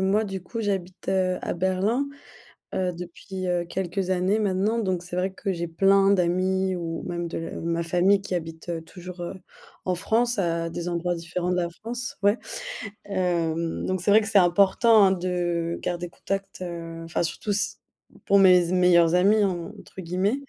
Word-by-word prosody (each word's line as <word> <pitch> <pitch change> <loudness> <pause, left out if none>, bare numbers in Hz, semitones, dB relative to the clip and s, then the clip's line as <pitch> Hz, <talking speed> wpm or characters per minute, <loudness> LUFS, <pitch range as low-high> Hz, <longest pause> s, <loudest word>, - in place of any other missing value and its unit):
moi, 200 +3 +2
du 195 -2 -5
coup, 230 +5 -5
j'habite, 190 -4 -3
heu, 185 -1 +1
à - - -3
Berlin, 190 +9 0 0.7
heu, 180 -1 0
depuis, 180 +2 -7
heu, 175 -1 0
quelques 190 +1 -2
années 185 +3 +2
maintenant. 205 +2 +1
Donc, 185 -6 0
c'est 175 0 -7
vrai 185 +1 -1
que 195 0 -3
j'ai 170 -1 -3
plein 195 +3 +4
d'amis 185 +1 +1
ou 165 -2 -4
même 175 0 -3
de 165 - -4
l 165 - -6
heu, - - -5
ma 170 0 -1
famille 180 +4 +3
qui 190 -2 -3
habite, 165 0 -6
heu, 165 -1 -2
toujours, 180 +1 -10
heu, 175 +2 -4 0.5
en 185 - +1
France 235 +6 +1
à 170 -3 0
des 170 +1 -5
endroits 175 0 -1
différents 175 +2 -3
de 180 - +1
la 175 -1 0
France, 240 +2 -5
ouais. 205 +3 +4 0.7
Hem, 170 -4 -1
donc, 185 -2 -1
c'est 205 - +2
vrai 215 - +8
que 215 - -3
c'est 215 - +3
important, 200 +4 +5
hein, 190 - +4
de 175 -2 -1
garder 175 0 -3
contact, 195 +2 -5
heu. 165 -2 -6
Enfin, 165 - -1
surtout 170 +5 -3
s 200 0 -1 0.5
pour 200 - +5
mes 185 -2 +7
z 170 - -3
«meilleurs 180 -2 +5
amis», 205 +4 +4
entre 190 +2 -4
guillemets. 185 +5 0
180 Hz, 185 wpm, -25 LUFS, 175-195 Hz, 0.7 s, vrai